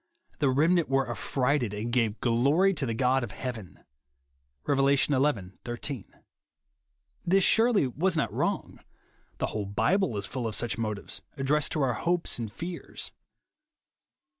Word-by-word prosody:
" - - -37
The 145 -3 +3
remnant 160 +5 +3
were 135 -1 +2
affrighted, 125 -1 0
and 115 +3 -4
gave 115 -3 +1
glory 140 +11 +3
to 145 -6 -2
the 115 - -2
God 130 +1 +2
of 120 - -4
heaven," 110 - -7 0.8
(Rev. 140 0 +3
xi. 145 - +2
IS). 120 -1 -2 1.2
This 190 +2 +3
surely 225 - +4
vvas 165 +7 0
not 150 - 0
wrong. - - -2 0.6
The - - 0
whole 105 -2 -3
Bible 125 - +1
is 100 - -1
full 120 +3 -3
of 110 - -4
such 115 -1 -1
motives, 105 -3 -4 0.2
addressed 140 +2 +1
to 150 - +1
our 130 -2 +1
hopes 170 +3 -1
and 110 -3 -4
fears. 170 - -7
130 Hz, 145 wpm, -28 LUFS, 115-150 Hz, 1.2 s, surely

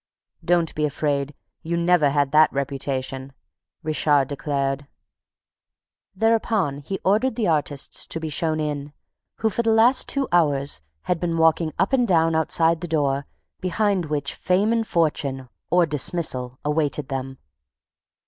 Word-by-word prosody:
"Don't 170 -2 +1
be 150 - -2
afraid: 145 -1 -1 0.3
you 170 +1 -2
never 170 -3 +3
had 140 -1 +1
that 155 +1 +5
reputation," 135 -1 -3 0.5
Richard 150 -3 +2
declared. 140 -1 -2 1.3
Thereupon 220 -8 +1
he 195 +7 -5
ordered 215 +7 +2
the 225 -5 0
artists 145 -3 -1
to 165 - -2
be 160 - -4
shown 155 +1 0
in, 145 -1 -3 0.4
who, 220 - 0
for 235 - 0
the 230 - 0
last 225 +4 +4
two 275 -2 0
hours, 145 - +1 0.2
had 180 -2 -1
been 170 -1 -1
walking 160 0 +3
up 195 +7 +1
and 245 -3 +3
down 165 -3 +3
outside 160 +1 +2
the 175 - -4
door 140 -3 0 0.3
behind 185 -1 0
which 145 -2 -2
fame 200 +5 +1
and 225 -1 0
fortune 140 -6 -1 0.2
or 175 -1 +4
dismissal 140 -4 -2
awaited 150 -2 -1
them. 135 -1 -4
155 Hz, 140 wpm, -23 LUFS, 140-180 Hz, 1.3 s, that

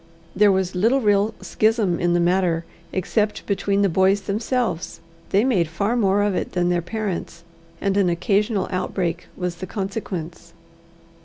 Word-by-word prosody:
There 205 +1 +5
was 190 -1 0
little 225 +9 +3
real 210 -1 +2
schism 205 0 +1
in 175 0 +1
the 175 - +3
matter, 175 -1 +1 0.3
except 210 +3 -1
between 200 0 +1
the - - +4
boys 190 +3 +3
themselves. 210 -4 -2 0.3
They 200 +3 +3
made 205 -11 +2
far 200 +8 -1
more 205 -3 +2
of 205 -1 +1
it - - -3
than 175 -1 +1
their 175 -1 +1
parents, 180 -3 -4 0.4
and 195 -1 0
an 195 -3 +3
occasional 200 +3 +1
outbreak 180 -2 -2
was 180 -1 -3
the 185 - -6
consequence. 180 -5 -5
190 Hz, 155 wpm, -22 LUFS, 175-210 Hz, 0.4 s, There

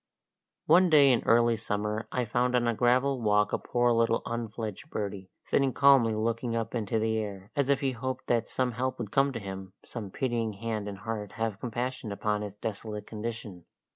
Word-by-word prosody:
One 180 +3 +6
day 145 -4 +7
in 120 - +3
early 115 0 +4
summer 105 0 -3
I 125 -1 0
found 125 +3 +1
on 120 -1 +2
a 115 - +2
gravel 125 +3 +2
walk 105 -1 +2
a - - +1
poor 120 0 +1
little 115 0 +2
unfledged 115 +2 -5
birdie, 100 -5 -4 0.2
sitting 135 -2 +2
calmly 135 -6 +5
looking 115 +2 -1
up 115 -1 -2
into 115 -2 -1
the 110 0 +1
air, 100 -2 -6
as 140 -2 +1
if 140 0 +3
he 135 -1 +1
hoped 130 +1 -4
that 120 -1 0
some 130 -1 0
help 130 +2 -2
would 110 -5 -5
come 135 +3 +3
to 115 - -3
him, 95 -2 -7
some 110 -5 -6
pitying 115 -1 -1
hand 110 0 -4
and 100 -1 -5
heart 105 -1 -5
have 110 -2 -2
compassion 125 -1 -3
upon 105 +1 -1
his 105 -1 -6
desolate 105 0 -5
condition. 110 -5 -6
115 Hz, 195 wpm, -29 LUFS, 105-125 Hz, 0.2 s, day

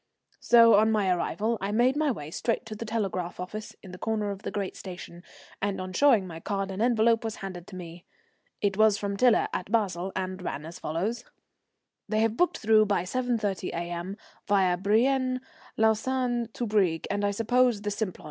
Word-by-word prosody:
So 230 -1 +6
on 220 +2 +5
my 205 -4 +2
arrival 215 +5 -1
I 195 +1 -2
made 245 +5 +3
my 305 0 +1
way 155 - -4
straight 230 +6 -1
to 220 - -7
the 230 - -6
telegraph 195 -6 -2
office 210 +4 -6
in 190 - -10
the 180 - -10
corner 215 -2 -1
of 195 0 -7
the - - -4
great 200 -2 -4
station, 175 -2 -9 0.4
and 200 -1 -1
on 185 0 -5
showing 235 -5 +4
my 165 -3 -8
card 195 +2 -3
an 190 +2 -4
envelope 230 -1 +3
was 225 -1 -3
handed 185 -3 -8
to 185 - -10
me. 170 -1 -9 0.6
It 200 -2 0
was 215 -1 +5
from 200 -1 -3
Tiler 235 +2 +4
at 185 - -4
Basle, 195 -5 0
and 185 0 -3
ran 150 -4 -4
as 165 +1 -9
follows: 200 +10 -2 0.9
"They 215 0 +1
have 225 0 +1
booked 355 +8 +2
through 215 -2 +4
by 200 -4 +1
7.30 215 -3 -1
A.M., 175 +3 -4 0.3
via 190 -3 +3
Brienne, 255 +7 +2 0.4
Lausanne 240 +2 +1
to 240 - -3
Brieg, 195 -7 +1
and 205 0 -1
I 205 - +2
suppose 230 +1 +2
the 205 - -1
Simplon. 205 -2 -3
205 Hz, 190 wpm, -27 LUFS, 185-230 Hz, 0.9 s, So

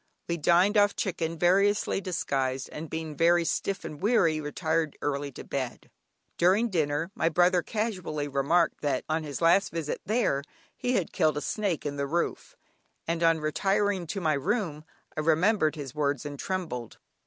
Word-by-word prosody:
We 170 - -1
dined 180 +6 +4
off 205 0 +3
chicken 165 -4 -2
variously 195 +4 +2
disguised, 135 -8 -2
and 155 0 -7
being 160 -1 -5
very 170 +2 +4
stiff 195 +3 -2
and 150 +1 -7
weary, 180 -8 +3
retired 160 +1 -1
early 140 -1 -2
to - - -8
bed. 130 -3 -5 0.5
During 195 +7 +4
dinner, 160 0 0
my 165 - +1
brother 175 +2 +3
casually 185 -7 -3
remarked 145 +5 +1
that 140 -3 0
on 155 +1 -1
his 145 +1 -5
last 170 +4 +4
visit 160 -2 -3
there 215 - +1 0.3
he 250 - -1
had 190 -8 -1
killed 155 -2 +2
a - - -2
snake 200 -6 -2
in 145 -1 -3
the 140 0 -1
roof, 170 +4 -2 0.5
and 165 0 -1
on 165 -1 +3
retiring 195 +3 0
to 195 - -3
my 160 -4 +1
room 155 - -1 0.3
I - - -3
remembered 160 +2 +2
his 140 -4 -7
words 145 -3 -1
and 145 -1 -6
trembled. 165 - -4
165 Hz, 165 wpm, -28 LUFS, 150-185 Hz, 0.5 s, dined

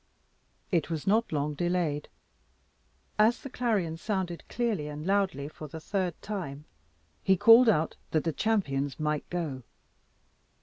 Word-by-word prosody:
It 170 -4 +1
was 160 -3 -3
not 220 +4 +2
long 150 -1 -1
delayed. 170 -2 -1 1.1
As 225 +3 +4
the 275 - -8
clarion 205 -11 0
sounded 185 -2 -3
clearly 220 -11 -1
and 150 +1 -6
loudly 190 -8 +1
for 155 0 -9
the 160 +3 -8
third 185 0 -2
time, 155 -9 -5 0.6
he 190 -1 +3
called 230 +5 +8
out 160 -6 +1
that 155 - +1
the 165 - -1
champions 145 -11 0
might 150 -1 -1
go. 160 -7 -3
170 Hz, 135 wpm, -29 LUFS, 150-205 Hz, 1.1 s, called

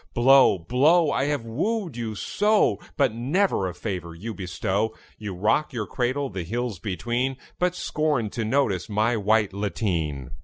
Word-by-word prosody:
Blow, 130 -3 +6
blow! 145 - +3
I 135 - +1
have 145 -5 -1
wooed 175 - -2
you 115 -2 -4
so, 210 - +2 0.2
But 135 -7 +3
never 130 - +1
a 90 - -5
favour 90 -6 -5
you 110 +7 -6
bestow. 100 +3 -2 0.2
You 105 -3 -5
rock 110 +11 +1
your 110 -4 -2
cradle 130 +6 -1
the 95 -1 -4
hills 115 +2 -3
between, 120 +8 -2 0.2
But 180 0 +1
scorn 150 - -1
to 115 - -3
notice 110 -6 0
my 110 +3 +1
white 105 -1 +2
lateen. 85 - -2
115 Hz, 155 wpm, -25 LUFS, 100-140 Hz, 0.2 s, Blow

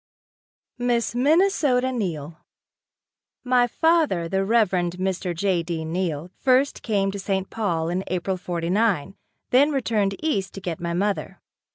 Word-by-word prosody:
Miss 240 -1 0
Minnesota 280 -2 +3
Neill. 165 - -4 1.0
My 250 -1 +3
father, 310 - +2
the 195 +2 0
Reverend 195 -5 +2
Mr. 185 -1 -2
J. 185 0 +1
D. 165 -1 -4
Neill, 170 -1 -3
first 265 +1 +2
came 200 -3 0
to 200 - -6
St. 195 -1 -2
Paul 170 -7 -1
in 180 +2 -1
April 185 +1 -2
'49, 180 +1 0 0.4
then 275 +4 +5
returned 220 -8 0
east 205 -12 -1
to - - -5
get 175 -4 -4
my 170 0 -3
mother. 200 +2 -2
195 Hz, 135 wpm, -24 LUFS, 175-245 Hz, 1.0 s, then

